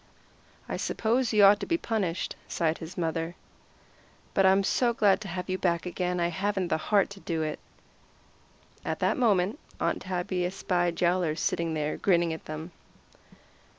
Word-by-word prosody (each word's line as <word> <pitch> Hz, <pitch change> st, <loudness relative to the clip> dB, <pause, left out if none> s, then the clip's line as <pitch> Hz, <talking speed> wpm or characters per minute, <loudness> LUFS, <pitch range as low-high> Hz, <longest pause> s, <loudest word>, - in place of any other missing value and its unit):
"I -, -, -3 dB
suppose 235 Hz, +2 st, 0 dB
you 210 Hz, -2 st, +5 dB
ought 200 Hz, +1 st, +7 dB
to -, -, -5 dB
be 335 Hz, -, +2 dB
punished," 200 Hz, -, -2 dB
sighed 160 Hz, -1 st, 0 dB
his 160 Hz, +2 st, -8 dB
mother, 165 Hz, 0 st, -2 dB, 1.0 s
"but 195 Hz, -1 st, +4 dB
I'm 195 Hz, +1 st, +4 dB
so 235 Hz, +4 st, +2 dB
glad 205 Hz, -2 st, +4 dB
to 210 Hz, -, -6 dB
have 180 Hz, 0 st, -4 dB
you 185 Hz, 0 st, -2 dB
back 170 Hz, -2 st, 0 dB
again 180 Hz, 0 st, -2 dB
I 170 Hz, 0 st, +1 dB
haven't 190 Hz, +1 st, -1 dB
the -, -, +2 dB
heart 200 Hz, -2 st, +3 dB
to 200 Hz, -, -9 dB
do 165 Hz, -4 st, -2 dB
it." 155 Hz, -1 st, -3 dB, 1.2 s
At -, -, -2 dB
that -, -, +1 dB
moment 215 Hz, -, +2 dB, 0.2 s
Aunt -, -, 0 dB
Tabby 180 Hz, 0 st, -2 dB
espied 175 Hz, -2 st, -1 dB
Yowler 175 Hz, -3 st, +2 dB
sitting 165 Hz, 0 st, -1 dB
there 150 Hz, 0 st, -1 dB
grinning 170 Hz, -3 st, +2 dB
at 160 Hz, -, -8 dB
them. 155 Hz, +3 st, -6 dB
180 Hz, 165 wpm, -28 LUFS, 170-200 Hz, 1.2 s, ought